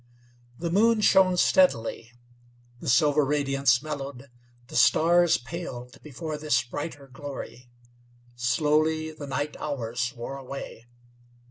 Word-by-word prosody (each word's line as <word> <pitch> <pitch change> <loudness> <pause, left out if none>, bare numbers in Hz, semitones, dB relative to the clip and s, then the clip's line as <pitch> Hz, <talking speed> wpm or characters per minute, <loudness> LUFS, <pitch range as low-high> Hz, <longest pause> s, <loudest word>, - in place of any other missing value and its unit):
The 170 -1 -3
moon 220 +4 +3
shone 190 -3 +4
steadily; 115 -11 +2 0.7
the - - -4
silver 145 +4 +4
radiance 135 -2 +1
mellowed; 140 -3 -6 0.3
the - - -12
stars 170 +8 +4
paled 125 -3 -8
before 155 +1 -6
this 145 -5 +1
brighter 145 +2 -7
glory. 135 -2 -9 0.7
Slowly 155 +5 +1
the 150 -2 -9
night 145 +2 -3
hours 120 -4 -3
wore 120 +3 -6
away. 135 -3 -8
145 Hz, 110 wpm, -26 LUFS, 125-155 Hz, 0.7 s, shone